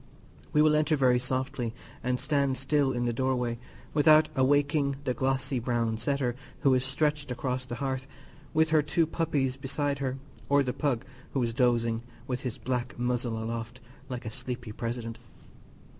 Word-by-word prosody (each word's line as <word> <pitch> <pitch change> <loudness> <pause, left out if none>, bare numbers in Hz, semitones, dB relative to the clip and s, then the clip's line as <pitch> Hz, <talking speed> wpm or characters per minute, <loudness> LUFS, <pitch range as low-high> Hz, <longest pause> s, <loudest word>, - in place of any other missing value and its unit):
We 150 - +5
will 155 0 +5
enter 155 +1 +3
very 125 -3 +4
softly 130 -2 -2 0.3
and 125 0 0
stand 140 -3 +1
still 140 +1 +2
in 120 -1 -1
the 120 - +1
open 120 - -2
doorway, 125 -3 0 0.3
without 155 +1 +6
awaking 140 +1 +3
the 130 -2 0
glossy 130 +1 0
brown 115 -2 0
setter 130 0 0 0.3
who 135 - +5
is 130 -1 +3
stretched 145 +2 0
across 125 +1 -2
the 120 - -5
hearth, 130 +1 -2 0.4
with 160 0 +3
her 155 -1 +6
two 155 +3 +2
puppies 145 -5 0
beside 140 +1 -1
her; 135 -1 -2 0.3
or 140 0 +5
the 125 -2 -2
pug, 135 -7 0 0.3
who 135 - +1
is 115 -1 -1
dozing, 115 -1 +2 0.2
with 125 0 -2
his 125 -4 -4
black 125 0 -2
muzzle 120 -1 0
aloft, 115 +1 -4 0.3
like 125 -2 -5
a 110 - -4
sleepy 125 -2 -5
president. 115 +1 -4
130 Hz, 170 wpm, -29 LUFS, 120-140 Hz, 0.4 s, without